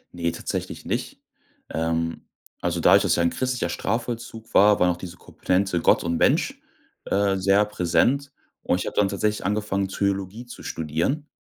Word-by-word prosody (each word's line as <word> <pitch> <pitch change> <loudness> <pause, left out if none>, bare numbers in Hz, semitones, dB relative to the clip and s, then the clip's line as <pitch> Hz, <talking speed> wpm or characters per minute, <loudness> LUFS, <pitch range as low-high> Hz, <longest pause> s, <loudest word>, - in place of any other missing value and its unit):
Ne, 85 -1 -1
tatsächlich 80 - -5
nicht. - - -3 0.5
Ähm, 80 0 -2 0.3
also 85 0 -1
dadurch, - - +6
dass - - +2
es - - +3
ja 85 - +1
ein 85 - +2
christlicher 130 -1 -1
Strafvollzug 115 -1 -4
war, 105 +1 +6
war 90 0 +4
auch 85 - -4
diese 90 -1 -9
Komponente 90 -2 -1
Gott - - +4
und 85 -1 -1
Mensch, - - +2 0.4
äh, 100 0 +1
sehr 100 +2 +3
präsent, 125 +9 +1 0.3
und 90 - 0
ich - - -3
hab - - -4
dann 100 -2 +3
tatsächlich 105 +1 -1
angefangen, 100 -1 0
Theologie 100 +3 -2
zu 120 - -11
studieren. 85 - -2
100 Hz, 170 wpm, -24 LUFS, 85-105 Hz, 0.5 s, dadurch